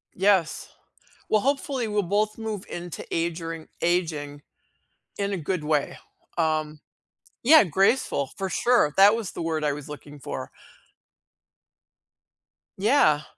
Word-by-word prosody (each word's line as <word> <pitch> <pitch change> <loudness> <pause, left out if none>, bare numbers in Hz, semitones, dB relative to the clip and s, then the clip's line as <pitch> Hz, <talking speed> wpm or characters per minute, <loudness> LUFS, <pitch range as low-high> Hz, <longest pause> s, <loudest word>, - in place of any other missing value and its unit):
Yes. 190 -4 +2 0.6
Well, 215 - +3
hopefully, 275 -3 -1
we'll 210 -1 +1
both 210 +4 0
move 215 -3 -4
into 175 -2 -6
age 170 0 -1
ring 165 -1 -6
aging 155 -5 -1 0.8
in 200 0 -1
a - - -1
good 165 0 -2
way, 150 -2 0 0.4
um 155 -2 0 0.6
Yeah, 305 +2 +8
graceful 190 - +1
for 190 -1 -2
sure. 235 -13 +2
That 200 +3 +7
was 225 -5 -4
the - - -6
word 160 -2 -2
I 145 -1 +1
was 145 0 -8
looking 145 0 -10
for. - - -6 2.3
Yeah. 210 - +4
175 Hz, 125 wpm, -25 LUFS, 155-210 Hz, 2.3 s, Yeah